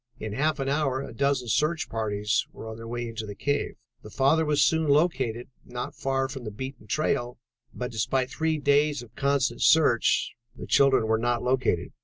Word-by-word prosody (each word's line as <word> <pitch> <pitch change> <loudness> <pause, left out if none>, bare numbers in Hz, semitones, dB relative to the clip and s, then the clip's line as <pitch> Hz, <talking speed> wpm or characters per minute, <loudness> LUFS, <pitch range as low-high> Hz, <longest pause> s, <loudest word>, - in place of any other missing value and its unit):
In 110 -1 -5
half 150 +6 0
an 135 - -2
hour 135 -2 0
a - - -8
dozen 140 0 0
search 155 +7 +1
parties 105 -2 -1
were - - -10
on 110 - -6
their 115 0 -9
way 120 0 -4
into 110 -1 -6
the 100 - -7
cave. 145 +6 -1 0.3
The 105 - -11
father 140 +8 +2
was 150 -2 +3
soon 160 -1 +2
located, 135 -6 +1 0.2
not 125 +3 -6
far 135 0 -1
from 130 -1 -8
the 110 - -4
beaten 125 +1 -8
trail, 120 -2 -1 0.3
but 125 0 -5
despite 130 +4 -1
three 160 0 0
days 145 -1 +2
of 120 - -17
constant 135 -4 0
search, 140 -8 +4 0.2
the - - -8
children 135 -4 +4
were 110 0 +1
not 120 0 0
located. 125 -9 0
130 Hz, 190 wpm, -26 LUFS, 115-145 Hz, 0.3 s, search